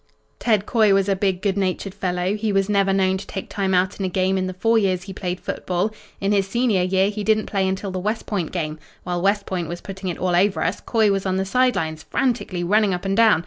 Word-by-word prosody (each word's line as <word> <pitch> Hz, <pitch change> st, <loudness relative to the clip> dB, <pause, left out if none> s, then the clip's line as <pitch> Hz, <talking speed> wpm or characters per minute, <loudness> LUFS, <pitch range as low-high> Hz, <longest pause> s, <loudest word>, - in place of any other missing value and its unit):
"Ted 215 Hz, -4 st, +2 dB
Coy 215 Hz, -4 st, +4 dB
was 195 Hz, 0 st, +2 dB
a 195 Hz, -, +2 dB
big, 190 Hz, -1 st, -1 dB
good 200 Hz, -2 st, +1 dB
natured 190 Hz, 0 st, -2 dB
fellow. 180 Hz, -1 st, -1 dB
He 215 Hz, 0 st, -1 dB
was 195 Hz, -1 st, +2 dB
never 200 Hz, -1 st, +2 dB
known 190 Hz, -1 st, +2 dB
to 190 Hz, -, -9 dB
take 190 Hz, -, -6 dB
time 195 Hz, -2 st, 0 dB
out 185 Hz, +3 st, +1 dB
in -, -, -2 dB
a 190 Hz, -, 0 dB
game 185 Hz, +1 st, +1 dB
in 185 Hz, -1 st, 0 dB
the 185 Hz, -, -5 dB
four 225 Hz, +5 st, +3 dB
years 185 Hz, -3 st, 0 dB
he 195 Hz, 0 st, -8 dB
played 185 Hz, -1 st, -4 dB
football. 180 Hz, +4 st, -2 dB, 0.3 s
In 195 Hz, +1 st, 0 dB
his 200 Hz, -2 st, +2 dB
senior 230 Hz, -3 st, +1 dB
year 190 Hz, +2 st, +2 dB
he 210 Hz, 0 st, -4 dB
didn't 215 Hz, 0 st, +2 dB
play 195 Hz, -2 st, 0 dB
until 190 Hz, +1 st, -2 dB
the 185 Hz, -, -3 dB
West 210 Hz, +4 st, -2 dB
Point 185 Hz, -7 st, -2 dB
game. 155 Hz, -3 st, -3 dB, 0.2 s
While 175 Hz, -1 st, -2 dB
West 200 Hz, +2 st, +1 dB
Point 180 Hz, -3 st, -3 dB
was 175 Hz, 0 st, -5 dB
putting 190 Hz, 0 st, -6 dB
it 175 Hz, -, -4 dB
all 180 Hz, -1 st, 0 dB
over 195 Hz, +3 st, +2 dB
us, 180 Hz, +4 st, -1 dB
Coy 220 Hz, -3 st, +2 dB
was 195 Hz, 0 st, -1 dB
on 185 Hz, -, 0 dB
the 190 Hz, -, 0 dB
side 250 Hz, +5 st, +2 dB
lines, 160 Hz, -1 st, -2 dB
frantically 235 Hz, -, -1 dB
running 205 Hz, +1 st, +3 dB
up 180 Hz, -, -7 dB
and 195 Hz, 0 st, 0 dB
down. 220 Hz, -5 st, +5 dB
195 Hz, 260 wpm, -22 LUFS, 185-205 Hz, 0.3 s, down